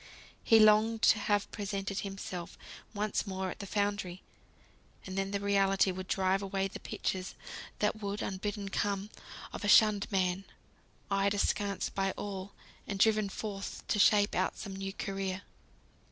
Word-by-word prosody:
He 225 - +6
longed 215 +1 +5
to 215 - +6
have 205 0 0
presented 200 -1 -3
himself 195 -3 -6 0.3
once 210 0 -1
more 190 -1 -2
at - - -9
the 200 - -6
foundry; 200 -3 -1 0.8
and 185 - -6
then 195 0 -1
the 200 0 -1
reality 195 -1 +3
would 185 0 -6
drive 190 0 +1
away 195 0 -1
the 195 - -8
pictures 185 0 -3 0.4
that 215 +1 0
would 200 0 -3
(unbidden) 200 +1 -3
come 200 +1 -1 0.4
of - - -6
a - - 0
shunned 210 -1 +5
man, 190 0 +1 0.7
eyed 195 +1 +2
askance 200 0 0
by 195 0 0
all, 200 -1 -6 0.3
and 200 - -3
driven 215 0 +3
forth 200 0 -5
to 210 - +1
shape 205 0 +5
out - - 0
some 195 -2 -6
new 195 0 -4
career. 195 0 -3
200 Hz, 155 wpm, -32 LUFS, 195-205 Hz, 0.8 s, He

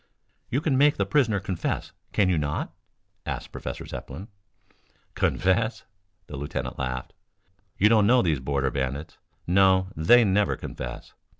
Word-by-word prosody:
"You 135 - 0
can 140 -4 +1
make 145 +1 +4
the 100 - +1
prisoner 110 -1 +2
confess, 95 -3 -3 0.2
can 100 - +2
you 90 -4 +2
not?" 75 -1 -3 0.5
asked - - -4
Professor - - -6
Zepplin. 95 - -8 0.8
"Confess?" 110 +5 0 0.4
the 75 - -8
lieutenant 65 -2 -4
laughed. 65 -1 -4 0.6
"You 105 - +5
don't 105 -2 +4
know 125 +2 +5
these 80 -6 +1
Border 70 0 -1
Bandits. 70 +3 -4 0.3
No, 95 +1 +4
they 115 +11 +6
never 100 -1 +2
confess. - - -7
95 Hz, 135 wpm, -26 LUFS, 70-110 Hz, 0.8 s, they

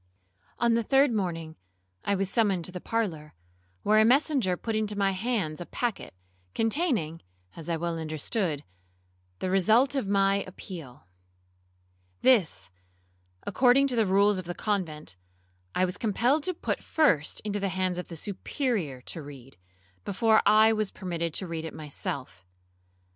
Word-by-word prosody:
'On 235 -1 +3
the 230 - +2
third 270 +4 +4
morning 165 -6 -3 0.5
I 200 - +1
was 195 0 0
summoned 195 -5 +1
to - - -5
the 180 -1 -7
parlour, 175 - -3 0.5
where 215 +1 +4
a - - +7
messenger 250 - +3
put 225 +3 -3
into 210 -1 -1
my 195 -1 +2
hands 190 -6 -2
a - - -5
packet, 235 - -3 0.4
containing 225 - 0 0.3
(as 165 0 -8
I 165 - 0
well 170 0 -2
understood) 155 +1 -2 0.7
the 185 - -2
result 220 +9 +4
of 270 -7 -1
my 195 0 +3
appeal. 165 - -10 1.2
This, 155 - +3 0.7
according 255 +6 +4
to 250 - +2
the 225 -3 +2
rules 200 +1 +3
of 185 - -7
the 175 0 -5
convent, 155 - -3 0.6
I 185 - +3
was 180 - -3
compelled 240 +7 +2
to 365 - 0
put - - -3
first 185 - +2
into 205 -1 -3
the 195 0 -1
hands 185 -1 -1
of 180 - -6
the 170 - -8
Superior 195 - -3
to 160 - -3
read, 135 -3 -12 0.5
before 220 +2 +3
I 215 +1 +6
was 215 -2 0
permitted 170 -2 -4
to 190 - 0
read 165 -1 -4
it 160 - -7
myself. 145 - -5
195 Hz, 155 wpm, -28 LUFS, 165-225 Hz, 1.2 s, a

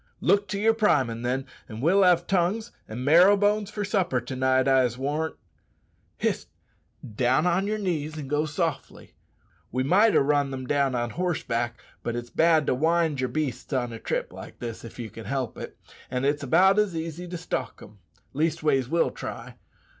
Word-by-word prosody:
"Look 200 0 +2
to 195 +1 -3
yer 225 +2 +4
primin', 135 - +1
then, 130 +2 -1 0.2
an' 110 -1 -7
we'll 175 +9 +3
have 175 -2 +4
tongues 195 +6 0 0.2
and 120 +4 -6
marrow 180 +7 +6
bones 205 0 +1
for 210 -1 -3
supper 190 - 0
to 125 +3 -7
night, 130 0 +2
I'se 130 -3 +3
warrant. 150 +4 -2 0.8
Hist! - - -1 0.7
down 130 +7 +2
on 180 +3 +1
yer 215 +1 -1
knees 160 -6 -3
and 145 -3 -6
go 150 +2 0
softly. 150 - -4 0.6
We 130 +2 0
might 200 +10 +4
ha' - - +5
run 145 0 +2
them 130 -1 -5
down 140 -1 +1
on 120 -1 -2
horseback, 120 -10 -2 0.2
but 120 - -3
it's 120 0 -6
bad 160 -2 +3
to - - +2
wind 160 0 +1
yer 130 - 0
beasts 135 -3 -3
on 120 -3 -1
a 115 - -7
trip - - -3
like - - -10
this, 115 -2 -6
if 115 - -10
ye 120 -2 -5
can 110 0 -10
help 135 -3 -3
it; - - -8 0.3
an' 125 +1 -2
it's 145 +1 +1
about 185 +9 +4
as 205 -5 +1
easy 165 +2 -5
to 175 0 -5
stalk 150 -8 -4
them. 105 -1 -14 0.3
Leastways, 150 -3 +1
we'll 165 +2 +2
try. - - -7
150 Hz, 185 wpm, -26 LUFS, 130-180 Hz, 0.8 s, marrow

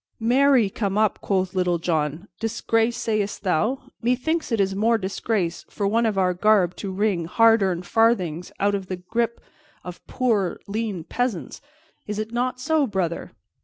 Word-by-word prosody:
"Marry, 250 0 +4
come 200 -1 -2
up!" 215 -1 +1
quoth 190 -2 0
Little 180 -2 +1
John. 160 +1 -2
"Disgrace, 225 0 0
sayest 210 -3 -2
thou? 220 +9 0
Methinks 265 +7 0
it 225 - +1
is 195 -1 +2
more 225 +4 +2
disgrace 190 -3 -2
for 200 - -2
one 230 +3 +2
of 210 -3 -1
our 185 -1 +2
garb 185 -1 +3
to 195 - -4
wring 190 -3 0
hard 225 +5 +4
earned 180 -2 0
farthings 185 -7 +1
out 205 +1 +2
of 195 -2 -3
the 185 - -3
gripe 230 +6 -2 0.4
of 180 -1 -9
poor 215 -8 0
lean 205 -4 -3
peasants. 245 -2 -3 0.5
It 210 0 -3
is 215 +1 -3
not 250 +1 -1
so, 290 +2 +1
brother?" 185 -5 -3
210 Hz, 165 wpm, -23 LUFS, 185-230 Hz, 0.5 s, Marry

